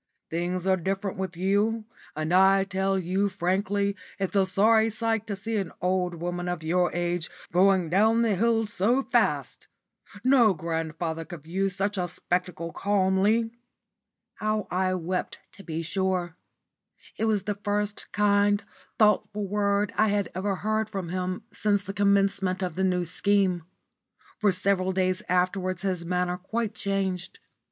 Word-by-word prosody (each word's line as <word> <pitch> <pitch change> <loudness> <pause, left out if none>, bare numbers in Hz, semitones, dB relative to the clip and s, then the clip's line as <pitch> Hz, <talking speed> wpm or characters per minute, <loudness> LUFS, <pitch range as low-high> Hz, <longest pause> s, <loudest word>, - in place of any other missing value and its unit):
Things 175 +2 -2
are 190 -1 +3
different 190 +2 -2
with 190 -3 -4
you, 205 +4 +1 0.3
and 155 +2 -2
I 190 +1 +5
tell 195 0 0
you 190 +3 0
frankly 200 +2 0 0.2
it's 195 0 -2
a 195 -1 +4
sorry 220 +3 +4
sight 225 0 -1
to 205 - -2
see 220 +3 -3
an 195 -4 -2
old 180 -1 0
woman 175 +1 -4
of 175 -2 -3
your 175 +2 +1
age 175 -1 -1 0.2
going 185 0 +4
down 220 +7 +3
the 225 -3 +2
hill 225 +3 +2
so 230 +5 +1
fast. - - 0 0.6
No 245 -6 +5
grandfather 165 0 -3
could 165 -3 -10
view 190 +5 -1
such 195 +1 -1
a 180 - 0
spectacle 175 -1 -3
calmly." 205 +4 +2 0.9
How 215 -1 -1
I 185 0 +1
wept 180 +1 -3 0.2
to 200 - -11
be 165 -1 -4
sure. 180 0 -1 0.8
It 225 - -1
was 210 -4 +1
the 210 - -1
first 205 0 -2
kind, 205 0 +3 0.3
thoughtful 210 -1 +2
word 200 +1 0
I 215 - +3
had 205 -1 0
ever 195 +2 -1
heard 215 +2 -1
from 195 -5 -4
him 185 +3 -3
since 205 -1 +1
the 195 - -6
commencement 195 -2 +2
of 180 -3 -2
the 190 - -1
New 180 -2 +1
Scheme. 185 -1 +1 0.7
For 210 -2 +3
several 185 0 +1
days 185 -1 0
afterwards 185 0 0
his 185 -3 -1
manner 180 +1 -1
quite 220 +3 -3
changed. 190 -3 -2
190 Hz, 150 wpm, -26 LUFS, 180-205 Hz, 0.9 s, I